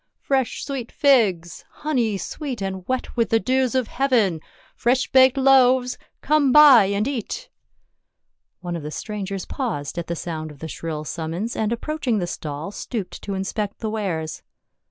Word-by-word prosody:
Fresh 265 Hz, -3 st, -1 dB
sweet 265 Hz, -4 st, -5 dB
figs! 200 Hz, -, +2 dB
— -, -, -40 dB
honey 240 Hz, -9 st, +1 dB
sweet 265 Hz, -, -5 dB
and 190 Hz, -2 st, -5 dB
wet 255 Hz, 0 st, -2 dB
with 230 Hz, -2 st, +1 dB
the 225 Hz, -, +3 dB
dews 260 Hz, +1 st, +1 dB
of 255 Hz, -3 st, +1 dB
heaven! 230 Hz, -, +1 dB, 0.3 s
Fresh 250 Hz, +3 st, +1 dB
baked 260 Hz, +1 st, +6 dB
loaves! 260 Hz, -2 st, +4 dB, 0.3 s
Come 295 Hz, -2 st, +3 dB
buy 280 Hz, -7 st, +8 dB
and 200 Hz, +3 st, 0 dB
eat 280 Hz, -, -4 dB, 0.5 s
!" -, -, -56 dB
One 175 Hz, -1 st, -4 dB
of 170 Hz, -, -4 dB
the 150 Hz, -, -6 dB
strangers 195 Hz, +1 st, -5 dB
paused 180 Hz, -, -3 dB
at 170 Hz, -, -5 dB
the 170 Hz, -, -2 dB
sound 155 Hz, -2 st, -5 dB
of 150 Hz, -, -12 dB
the 160 Hz, -, -7 dB
shrill 160 Hz, -1 st, -5 dB
summons, 170 Hz, +8 st, -4 dB
and 220 Hz, 0 st, -1 dB
approaching 250 Hz, -1 st, -1 dB
the 180 Hz, -, -1 dB
stall 155 Hz, 0 st, -5 dB
stooped 210 Hz, -2 st, -5 dB
to 200 Hz, -, -4 dB
inspect 200 Hz, +2 st, -3 dB
the 220 Hz, -2 st, -4 dB
wares. 175 Hz, -8 st, -3 dB
220 Hz, 170 wpm, -23 LUFS, 175-260 Hz, 0.5 s, buy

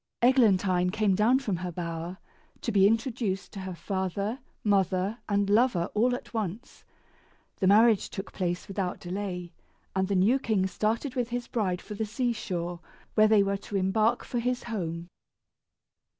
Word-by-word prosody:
Eglantine 195 Hz, -8 st, +4 dB
came 210 Hz, 0 st, +2 dB
down 215 Hz, +7 st, +4 dB
from 215 Hz, -9 st, -2 dB
her 180 Hz, +1 st, -4 dB
bower, 170 Hz, +1 st, -5 dB, 0.4 s
to 230 Hz, -, -2 dB
be 195 Hz, -2 st, +5 dB
introduced 225 Hz, -3 st, -1 dB
to 200 Hz, -, -6 dB
her 190 Hz, -1 st, -5 dB
father, 200 Hz, +5 st, -2 dB, 0.2 s
mother, 195 Hz, +1 st, +1 dB
and 200 Hz, -1 st, +2 dB
lover 205 Hz, -4 st, +2 dB
all 245 Hz, +4 st, +2 dB
at 245 Hz, -, -10 dB
once. 220 Hz, +3 st, -4 dB, 0.7 s
The 190 Hz, -, +1 dB
marriage 215 Hz, +1 st, +5 dB
took 195 Hz, -, -7 dB
place 175 Hz, -1 st, -2 dB
without 195 Hz, -2 st, -3 dB
delay, 180 Hz, -1 st, -5 dB, 0.4 s
and 190 Hz, 0 st, +1 dB
the 200 Hz, -, 0 dB
new 210 Hz, +9 st, +4 dB
king 215 Hz, -7 st, +1 dB
started 225 Hz, +7 st, -1 dB
with 245 Hz, -3 st, -1 dB
his 245 Hz, 0 st, -3 dB
bride 190 Hz, -7 st, -1 dB
for 210 Hz, -, -7 dB
the 220 Hz, +2 st, -2 dB
sea 240 Hz, +3 st, 0 dB
shore, 175 Hz, -5 st, -4 dB, 0.3 s
where 215 Hz, 0 st, +5 dB
they 215 Hz, -2 st, +5 dB
were 200 Hz, 0 st, 0 dB
to 200 Hz, +1 st, -8 dB
embark 215 Hz, +5 st, +2 dB
for 245 Hz, -, -2 dB
his 250 Hz, +1 st, -1 dB
home. 170 Hz, -7 st, -4 dB
200 Hz, 165 wpm, -28 LUFS, 185-230 Hz, 0.7 s, be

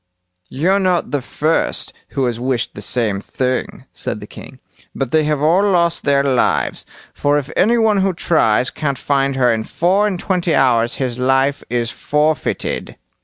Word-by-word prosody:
"You're 180 Hz, +9 st, +1 dB
not 185 Hz, -2 st, 0 dB
the 145 Hz, -2 st, -1 dB
first 155 Hz, +5 st, -1 dB, 0.2 s
who 135 Hz, -, +2 dB
has 120 Hz, -2 st, -2 dB
wished 125 Hz, -1 st, -1 dB
the 105 Hz, -, -8 dB
same 105 Hz, -2 st, -1 dB
thing", 130 Hz, +3 st, -3 dB
said -, -, -4 dB
the -, -, -9 dB
king, -, -, -12 dB, 0.4 s
"but 135 Hz, -3 st, -3 dB
they 155 Hz, -1 st, +3 dB
have 150 Hz, -1 st, 0 dB
all 170 Hz, +5 st, +4 dB
lost 175 Hz, -4 st, +1 dB
their 140 Hz, -1 st, +3 dB
lives; 130 Hz, -3 st, 0 dB, 0.3 s
for 145 Hz, 0 st, +1 dB
if 145 Hz, 0 st, -4 dB
any 235 Hz, +4 st, +3 dB
one 220 Hz, -2 st, +3 dB
who 195 Hz, 0 st, +2 dB
tries 130 Hz, -9 st, +1 dB
can't 140 Hz, -3 st, -2 dB
find 140 Hz, -1 st, 0 dB
her 125 Hz, -3 st, +3 dB
in 110 Hz, -1 st, -2 dB
four 190 Hz, -, +1 dB
and 190 Hz, -4 st, -3 dB
twenty 175 Hz, -4 st, 0 dB
hours 120 Hz, -3 st, +2 dB
his 125 Hz, -2 st, -3 dB
life 135 Hz, +2 st, +1 dB
is 120 Hz, 0 st, -1 dB
forfeited." 150 Hz, 0 st, -1 dB
140 Hz, 170 wpm, -18 LUFS, 125-170 Hz, 0.4 s, all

